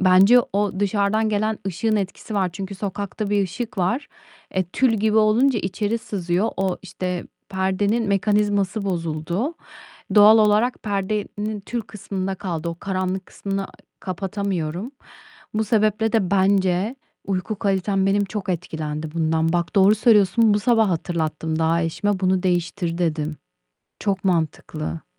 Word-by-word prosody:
Bence 195 Hz, +6 st, +6 dB
o 200 Hz, -1 st, 0 dB
dışarıdan 205 Hz, +2 st, +1 dB
gelen 215 Hz, +1 st, 0 dB
ışığın 215 Hz, +4 st, 0 dB
etkisi 200 Hz, +2 st, -4 dB
var. 190 Hz, -2 st, +1 dB
Çünkü 195 Hz, +1 st, -6 dB
sokakta 200 Hz, +1 st, -4 dB
bir 205 Hz, -1 st, +3 dB
ışık 220 Hz, +4 st, -5 dB
var. 240 Hz, +11 st, 0 dB, 0.4 s
E, 185 Hz, -1 st, 0 dB
tül 230 Hz, +7 st, +1 dB
gibi 215 Hz, +1 st, +1 dB
olunca 225 Hz, +3 st, +4 dB
içeri 205 Hz, +4 st, -1 dB
sızıyor. 185 Hz, 0 st, -1 dB
O, 190 Hz, -2 st, 0 dB
işte, 180 Hz, -1 st, -4 dB, 0.2 s
perdenin 200 Hz, +4 st, 0 dB
mekanizması 205 Hz, 0 st, +1 dB
bozuldu. 170 Hz, -, -2 dB, 0.6 s
Doğal 210 Hz, +2 st, +8 dB
olarak 215 Hz, +3 st, +3 dB
perdenin 205 Hz, +1 st, -2 dB
tül 235 Hz, +4 st, -4 dB
kısmında 195 Hz, -3 st, -4 dB
kaldı. 170 Hz, -4 st, -4 dB
O 170 Hz, -, -3 dB
karanlık 185 Hz, -1 st, -2 dB
kısmını, 195 Hz, 0 st, -4 dB
ııı, 195 Hz, -, -6 dB, 0.3 s
kapatamıyorum. 190 Hz, -, -3 dB, 0.6 s
Bu 220 Hz, +1 st, +1 dB
sebeple 215 Hz, +1 st, +1 dB
de, 195 Hz, -5 st, +1 dB
bence 195 Hz, +3 st, +2 dB, 0.3 s
uyku 195 Hz, +2 st, -2 dB
kalitem 195 Hz, 0 st, +1 dB
benim 200 Hz, +1 st, +2 dB
çok 200 Hz, 0 st, -5 dB
etkilendi 160 Hz, -3 st, -3 dB
bundan. 160 Hz, 0 st, +1 dB
Bak, 175 Hz, +4 st, -1 dB
doğru 200 Hz, +1 st, +6 dB
söylüyorsun, 215 Hz, 0 st, +4 dB
bu 205 Hz, -, +2 dB
sabah 225 Hz, -1 st, +3 dB
hatırlattım 160 Hz, -2 st, -2 dB
daha 165 Hz, +1 st, +2 dB
eşime, 190 Hz, +4 st, -1 dB
bunu 185 Hz, 0 st, +2 dB
değiştir, 175 Hz, -1 st, -1 dB
dedim. 155 Hz, -3 st, -1 dB, 0.6 s
Çok 195 Hz, -2 st, -2 dB
mantıklı. 155 Hz, -, -2 dB
195 Hz, 135 wpm, -22 LUFS, 180-210 Hz, 0.6 s, Doğal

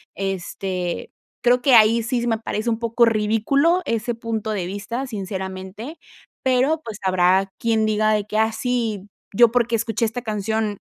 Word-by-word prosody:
este, 190 Hz, -1 st, -3 dB, 0.3 s
creo 245 Hz, +1 st, +4 dB
que 265 Hz, -1 st, +3 dB
ahí 225 Hz, +1 st, +5 dB
sí 240 Hz, +1 st, -1 dB
se 240 Hz, -, -2 dB
me 225 Hz, -1 st, +1 dB
parece 220 Hz, +1 st, -3 dB
un 225 Hz, -1 st, -1 dB
poco 235 Hz, 0 st, +3 dB
ridículo 230 Hz, +10 st, +2 dB
ese 230 Hz, +1 st, -1 dB
punto 225 Hz, -1 st, -3 dB
de 195 Hz, -4 st, -2 dB
vista, 230 Hz, +7 st, -4 dB
sinceramente, 190 Hz, -, -6 dB, 0.5 s
pero 265 Hz, +5 st, +2 dB
pues 215 Hz, -3 st, -7 dB
habrá 185 Hz, +1 st, +3 dB
quien 225 Hz, -1 st, +1 dB
diga 215 Hz, 0 st, +2 dB
de 210 Hz, -1 st, 0 dB
que: 210 Hz, +1 st, -3 dB
"Ah, 220 Hz, 0 st, +3 dB
sí, 225 Hz, -5 st, -2 dB, 0.3 s
yo 235 Hz, 0 st, +6 dB
porque 235 Hz, -1 st, +1 dB
escuché 225 Hz, 0 st, -1 dB
esta 230 Hz, +2 st, -3 dB
canción, 215 Hz, -1 st, -2 dB
220 Hz, 165 wpm, -22 LUFS, 205-235 Hz, 0.5 s, yo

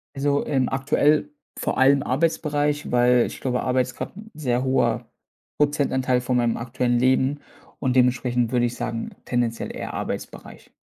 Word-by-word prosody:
Also, 140 Hz, +1 st, 0 dB
ähm, 130 Hz, -3 st, +1 dB
aktuell 145 Hz, +3 st, +2 dB, 0.3 s
vor -, -, -2 dB
allem 140 Hz, +1 st, +4 dB
Arbeitsbereich, 150 Hz, 0 st, 0 dB
weil 125 Hz, 0 st, +4 dB
ich -, -, -9 dB
glaube, 125 Hz, -1 st, -1 dB
Arbeit 130 Hz, 0 st, +2 dB
ist 125 Hz, -, -10 dB
grad -, -, -6 dB
'n 220 Hz, +1 st, -11 dB
sehr 130 Hz, -4 st, -1 dB
hoher 120 Hz, -3 st, +1 dB, 0.5 s
Prozentanteil 130 Hz, -4 st, +1 dB
von 125 Hz, 0 st, -1 dB
meinem 120 Hz, -1 st, +1 dB
aktuellen 120 Hz, 0 st, 0 dB
Leben 130 Hz, +3 st, +2 dB, 0.4 s
und 130 Hz, -1 st, 0 dB
dementsprechend 125 Hz, -1 st, +2 dB
würde 120 Hz, -1 st, +2 dB
ich 120 Hz, -, -3 dB
sagen 115 Hz, 0 st, -4 dB
tendenziell 120 Hz, -2 st, -1 dB
eher -, -, -6 dB
Arbeitsbereich. -, -, -7 dB
130 Hz, 155 wpm, -23 LUFS, 120-140 Hz, 0.5 s, allem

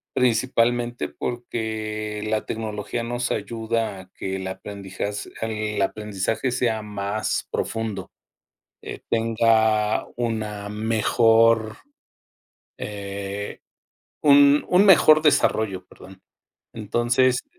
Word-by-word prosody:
Principalmente 120 Hz, 0 st, +1 dB
porque 110 Hz, -3 st, -4 dB
la 110 Hz, 0 st, 0 dB
tecnología 110 Hz, +1 st, -4 dB
nos 120 Hz, +1 st, -2 dB
ayuda 110 Hz, -1 st, -2 dB
a 95 Hz, 0 st, -13 dB
que 95 Hz, 0 st, -4 dB
el 95 Hz, -, -5 dB
aprendiza-, 95 Hz, +1 st, -5 dB, 0.3 s
el 110 Hz, -2 st, -2 dB
aprendizaje 105 Hz, +4 st, -2 dB
sea 120 Hz, -3 st, 0 dB
más 105 Hz, 0 st, -3 dB
profundo, 110 Hz, -4 st, -3 dB, 0.7 s
eh, -, -, -8 dB
tenga 110 Hz, -2 st, +2 dB
una 110 Hz, -3 st, -3 dB
mejor, 110 Hz, +1 st, +3 dB, 1.0 s
eh, 100 Hz, 0 st, -6 dB, 0.6 s
un 145 Hz, 0 st, +6 dB
un 185 Hz, +2 st, +5 dB
mejor 155 Hz, -5 st, +7 dB
desarrollo, 110 Hz, -, +2 dB
perdón. 95 Hz, 0 st, -15 dB, 0.5 s
Entonces, 120 Hz, +4 st, +1 dB
110 Hz, 90 wpm, -23 LUFS, 105-120 Hz, 1.0 s, mejor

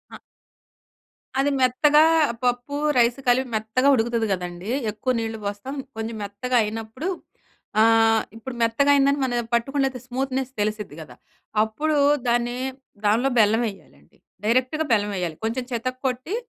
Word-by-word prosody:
ఆ! -, -, -12 dB, 1.2 s
అది 285 Hz, +1 st, +2 dB
మెత్తగా 295 Hz, +5 st, +5 dB, 0.4 s
పప్పు, 245 Hz, +3 st, -1 dB, 0.2 s
రైసు 240 Hz, +2 st, +3 dB
కలిపి 255 Hz, +1 st, +3 dB
మెత్తగా 220 Hz, +5 st, 0 dB
ఉడుకుతది 235 Hz, -1 st, +1 dB
గదండీ! 180 Hz, +3 st, -4 dB, 0.2 s
ఎక్కువ 240 Hz, +5 st, -2 dB
నీళ్ళు 225 Hz, 0 st, -3 dB
పోస్తాం, 205 Hz, +7 st, -5 dB, 0.2 s
కొంచెం 225 Hz, +1 st, -4 dB
మెత్తగా 225 Hz, +6 st, -3 dB
అయినప్పుడు, 225 Hz, -, -5 dB, 0.7 s
ఆహ్, 225 Hz, 0 st, +4 dB
ఇప్పుడు 245 Hz, +2 st, -7 dB
మెత్తగయిందని 280 Hz, +4 st, +3 dB
మనయా 240 Hz, -2 st, 0 dB
పట్టుకొని 275 Hz, +4 st, 0 dB
లేతే 260 Hz, -3 st, -4 dB
స్మూత్‌నెస్ 260 Hz, +1 st, -2 dB
తెలిసిద్ది 210 Hz, -6 st, -3 dB
గదా! 155 Hz, -, -12 dB, 0.5 s
అప్పుడూ 295 Hz, +8 st, -1 dB, 0.3 s
దాన్నీ 240 Hz, +1 st, +1 dB, 0.5 s
దాన్లో 235 Hz, +6 st, +3 dB
బెల్లమెయ్యాలండి. 205 Hz, -, -1 dB, 0.3 s
డైరెక్ట్‌గా 255 Hz, +7 st, +1 dB
బెల్లమెయ్యాలి. 195 Hz, -6 st, -1 dB
కొంచెం 240 Hz, +3 st, -1 dB
చితక్కొట్టి, 255 Hz, -, -3 dB
240 Hz, 115 wpm, -23 LUFS, 220-260 Hz, 1.2 s, మెత్తగా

